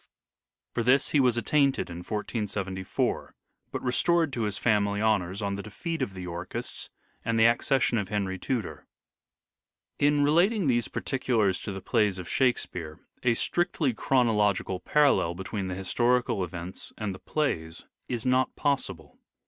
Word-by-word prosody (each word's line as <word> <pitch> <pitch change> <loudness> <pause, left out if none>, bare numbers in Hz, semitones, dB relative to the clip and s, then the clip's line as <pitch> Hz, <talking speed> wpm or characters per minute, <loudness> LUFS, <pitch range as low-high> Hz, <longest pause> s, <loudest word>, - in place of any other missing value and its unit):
For - - 0
this 125 +4 +3
he 150 - +3
was 125 -3 +3
at 120 - -2
tainted 140 -3 +2
in 85 - -6
1474, 100 -1 -3 0.4
but - - -4
restored 160 +4 +2
to 120 - -2
his 100 -1 -2
family 100 -3 +1
honours 100 -2 +1
on 100 0 -1
the - - -4
defeat 160 - -5
of 100 -7 -2
the 95 - -6
Yorkists 85 +1 -5 0.3
and 115 0 0
the 110 - +6
accession 120 +1 +3
of 100 - -3
Henry 95 -3 -2
Tudor. 120 -1 -3 1.1
In 145 0 +3
relating 175 +7 +3
these 120 -4 +2
particulars 115 -8 0
to - - -5
the 95 0 -6
plays 105 -5 +2
of 90 -2 -7
Shake 125 +4 +3
speare 80 -3 -7 0.2
a 120 -2 +2
strictly 160 -2 +1
chronological 105 -7 +1
parallel 140 - +3
between 95 +1 -4
the 90 - -3
historical 120 +2 +1
events 85 +1 -7
and 105 -3 -3
the 95 - -10
plays 80 - -2 0.2
is 120 -3 -3
not 130 0 +2
possible. 115 - -2
110 Hz, 155 wpm, -28 LUFS, 95-130 Hz, 1.1 s, the